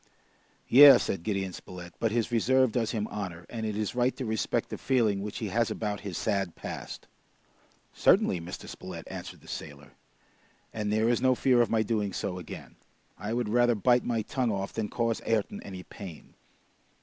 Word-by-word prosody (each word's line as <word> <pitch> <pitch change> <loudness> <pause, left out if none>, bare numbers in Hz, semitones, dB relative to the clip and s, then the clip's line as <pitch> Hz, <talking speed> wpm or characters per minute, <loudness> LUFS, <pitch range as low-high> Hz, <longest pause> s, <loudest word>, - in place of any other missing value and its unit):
"Yes," 135 0 +9
said 95 - -2
Gideon 95 -1 -2
Spilett, 90 -1 -10
"but 115 - +1
his 115 +1 0
reserve 130 +2 +3
does 115 -1 0
him 110 -2 -2
honor, 90 -5 -5
and 110 -2 -3
it 105 -1 -3
is 105 -2 -2
right 125 +1 +1
to 130 - -3
respect 110 -2 -1
the - - -6
feeling 110 -7 +1
which 105 0 -5
he 110 - -3
has 115 +4 +1
about 105 -2 -3
his 100 -4 -5
sad 100 -5 -1
past." - - -7 0.9
"Certainly, 85 - +3
Mr. 85 +2 -8
Spilett," - - -8
answered - - -8
the - - -18
sailor, 75 0 -8 0.8
"and 105 -1 -2
there 110 +1 +2
is 120 0 +2
no 130 -1 +4
fear 125 -1 +4
of 120 - +2
my 110 -1 +2
doing 105 -3 -1
so 90 -2 -3
again. 85 - -10 0.4
I 105 +3 -4
would 120 -1 -1
rather 120 +1 +3
bite 120 +4 +3
my 115 -2 -1
tongue 125 0 -1
off 100 -1 -3
than 110 -2 -2
cause 115 -1 -1
Ayrton 110 -3 -1
any 95 -2 -8
pain! 90 -5 -11
110 Hz, 185 wpm, -29 LUFS, 100-120 Hz, 0.9 s, Yes